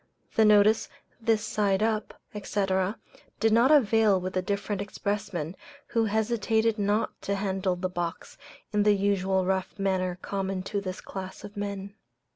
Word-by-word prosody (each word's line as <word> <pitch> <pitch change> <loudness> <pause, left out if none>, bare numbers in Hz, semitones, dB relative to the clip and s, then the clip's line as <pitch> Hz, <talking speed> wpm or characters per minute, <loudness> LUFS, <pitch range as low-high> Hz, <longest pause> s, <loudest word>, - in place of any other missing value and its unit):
The 220 - +4
notice, 210 +1 +5 0.3
"This 225 -1 +1
side 200 -1 +1
up, 220 -1 -1 0.2
&c.," 205 -1 -1 0.7
did 225 -1 +3
not 235 +4 +5
avail 225 -8 +5
with 185 0 -4
the 185 - +1
different 200 +1 -2
expressmen, 200 -5 -3 0.3
who 230 -1 +2
hesitated 220 +1 +1
not 205 +2 0
to 200 - -1
handle 190 -2 -1
the 180 +1 -2
box 175 -1 -5 0.4
in 210 - +3
the 205 0 +5
usual 190 -1 +1
rough 190 +2 -1
manner 185 -2 0
common 195 -1 -3
to 200 +1 -2
this 185 -1 -5
class 190 -1 -7
of 205 +1 -9
men. 200 -1 -4
200 Hz, 150 wpm, -27 LUFS, 190-215 Hz, 0.7 s, notice